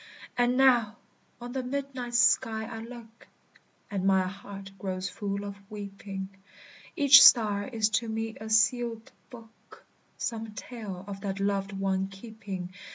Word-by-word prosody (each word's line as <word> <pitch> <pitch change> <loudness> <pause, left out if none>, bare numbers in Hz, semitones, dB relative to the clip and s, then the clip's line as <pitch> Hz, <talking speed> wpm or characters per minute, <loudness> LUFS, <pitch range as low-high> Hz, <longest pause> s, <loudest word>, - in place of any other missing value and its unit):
And 245 +1 +2
now 240 -5 +4 0.4
on 245 0 -7
the 265 +1 -2
midnight 255 -2 -4
sky 220 -2 +3
I 225 0 -7
look, 230 -1 -12 0.6
And 195 -2 -2
my 190 -1 +4
heart 195 0 -9
grows 185 -1 -3
full 200 +1 -4
of 200 -1 -6
weeping; 200 -2 -7 0.7
Each 285 -3 +9
star 205 -4 +6
is 220 -4 0
to 230 - -6
me 225 0 -2
a 220 - -9
sealèd 225 +1 +1 0.2
book, 230 -2 -15 0.3
Some 225 -2 -4
tale 205 -6 -7
of 195 -1 -7
that 195 -1 -4
loved 200 0 -1
one 195 0 -1
keeping. 195 -3 -8
215 Hz, 140 wpm, -28 LUFS, 195-240 Hz, 0.7 s, Each